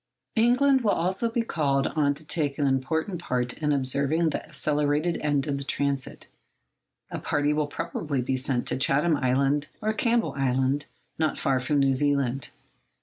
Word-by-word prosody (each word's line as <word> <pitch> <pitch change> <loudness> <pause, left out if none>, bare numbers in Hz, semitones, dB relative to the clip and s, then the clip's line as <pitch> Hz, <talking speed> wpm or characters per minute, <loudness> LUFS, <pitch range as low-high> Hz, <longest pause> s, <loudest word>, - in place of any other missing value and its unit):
England 255 +4 +4
will 220 - +1
also 190 +6 +1
be 230 0 -1
called 140 -9 0
on 145 -2 +1
to 155 +2 -9
take 145 -3 -1
an 145 - +1
important 160 +7 -1
part 125 -5 -1
in 150 -1 0
observing 140 +4 +1
the - - -3
accelerated 150 +3 0
end 145 -2 0
of 140 -1 -1
the - - -4
transit. 140 -1 -2 0.8
A - - -4
party 145 0 0
will 150 -1 0
probably 150 -2 -3
be 130 +1 -1
sent 130 -1 0
to - - 0
Chatham 145 +5 +2
Island 140 +2 +1
or 215 0 -1
Campbell 230 +2 +1
Island, 135 +1 0 0.3
not 155 -1 0
far 135 -2 +1
from 135 +4 0
New 135 -1 +3
Zealand. 135 -2 0
145 Hz, 165 wpm, -26 LUFS, 135-160 Hz, 0.8 s, England